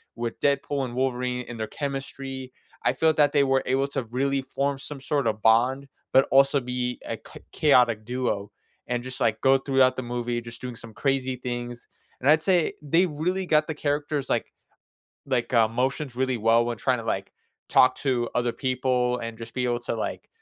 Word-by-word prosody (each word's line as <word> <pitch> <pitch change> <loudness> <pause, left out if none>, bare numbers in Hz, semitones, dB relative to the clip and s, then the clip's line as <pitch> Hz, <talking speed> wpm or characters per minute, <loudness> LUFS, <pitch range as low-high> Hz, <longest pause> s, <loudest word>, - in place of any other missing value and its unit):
with 115 -1 -4
Deadpool 140 -1 +1
and 120 -1 -7
Wolverine 125 -1 -1
and 115 -2 -7
their 110 - -2
chemistry. 135 -2 -5 0.3
I 125 - +3
feel 160 +4 +3
that 145 -2 +4
they 140 -1 +5
were 135 0 +2
able 135 +2 +1
to 135 -3 -2
really 135 +4 0
form 140 0 -2
some 140 -1 -8
sort 140 -4 0
of 110 0 -1
bond, 125 +5 +3 0.3
but 135 - +6
also 135 +1 +5
be 125 0 -3
a - - -3
c - - -13
chaotic 120 -7 +3
duo, 120 -5 -2 0.4
and 120 0 -2
just, 130 0 -6
like, 110 -1 +1
go 135 0 +5
throughout 135 -1 +3
the 130 - -2
movie 120 0 -2
just 115 +1 -10
doing 125 -1 -6
some 115 -2 -10
crazy 135 -1 0
things, 120 -1 -5 0.3
and 135 - +1
I'd 155 - +5
say 180 -4 +2
they 165 +5 +3
really 180 +4 -2
got 155 -2 +3
the 160 - -3
characters', 145 -1 -2
like - - 0 0.8
like, 125 -2 -1
uh, 115 -2 +5
motions 130 +2 -2
really 130 -1 0
well 115 +2 +4
when 120 -1 -2
tryna, 125 -1 0
like, 95 -2 -2 0.4
talk 130 - +5
to 125 -4 0
other 120 -1 +1
people 125 -1 0
and 115 -1 -6
just 115 0 -9
be 125 -1 -1
able 120 -1 0
to, 120 - -4
like - - -4
130 Hz, 195 wpm, -25 LUFS, 120-140 Hz, 0.8 s, but